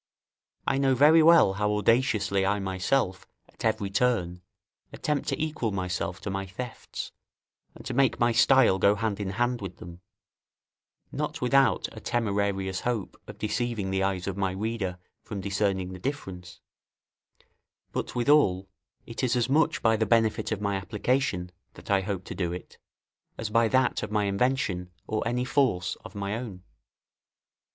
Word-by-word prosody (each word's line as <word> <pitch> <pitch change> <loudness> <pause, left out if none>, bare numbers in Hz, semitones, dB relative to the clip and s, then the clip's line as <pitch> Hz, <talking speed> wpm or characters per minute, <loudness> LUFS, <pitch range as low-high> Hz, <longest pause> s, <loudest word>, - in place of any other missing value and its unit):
I 135 - +1
know 135 -1 +3
very 150 +5 +6
well 165 - +6
how 105 +1 0
audaciously 105 -2 +2
I 100 +2 +1
myself, 95 +1 -1 0.2
at - - -13
every 110 -3 0
turn, 95 -6 0 0.5
attempt 150 -2 -2
to - - -2
equal 155 -8 -1
myself 90 -1 -3
to 100 - -4
my 95 0 -3
thefts, 120 +6 -7 0.6
and - - -13
to 130 - -4
make 135 0 +2
my 120 0 +3
style 115 -4 +5
go 100 +2 +4
hand 105 -1 -2
in 100 -2 -2
hand 120 +4 -1
with 95 -2 -7
them, 85 0 -11 1.1
not - - -3
without 135 -1 +3
a - - -9
temerarious 100 -4 -1
hope 120 -6 -2
of - - -10
deceiving 110 -2 -2
the 95 0 0
eyes 95 -2 -1
of 100 - -3
my 95 -2 -1
reader 100 -2 -3 0.2
from 105 - -6
discerning 95 -2 -1
the 90 - -8
difference; 90 -8 -6 1.3
but - - -4
withal 120 -8 +3 0.4
it 115 +3 -6
is 125 0 +2
as 120 0 +1
much 160 +3 +2
by 115 -1 +4
the 110 0 0
benefit 115 0 +2
of 110 - -1
my 100 -1 -1
application, 100 -1 -1 0.2
that - - -8
I 100 -1 +4
hope 95 -1 -3
to - - -7
do 90 -2 -2
it, 90 +1 -8 0.6
as 110 -1 -4
by 115 +1 +4
that 130 +2 +2
of 105 - -4
my 105 0 +1
invention 100 -3 0 0.2
or 110 0 -2
any 125 +1 0
force 125 -9 +1
of 100 - -11
my 100 +1 -2
own. 110 -6 -7
105 Hz, 160 wpm, -27 LUFS, 95-120 Hz, 1.3 s, very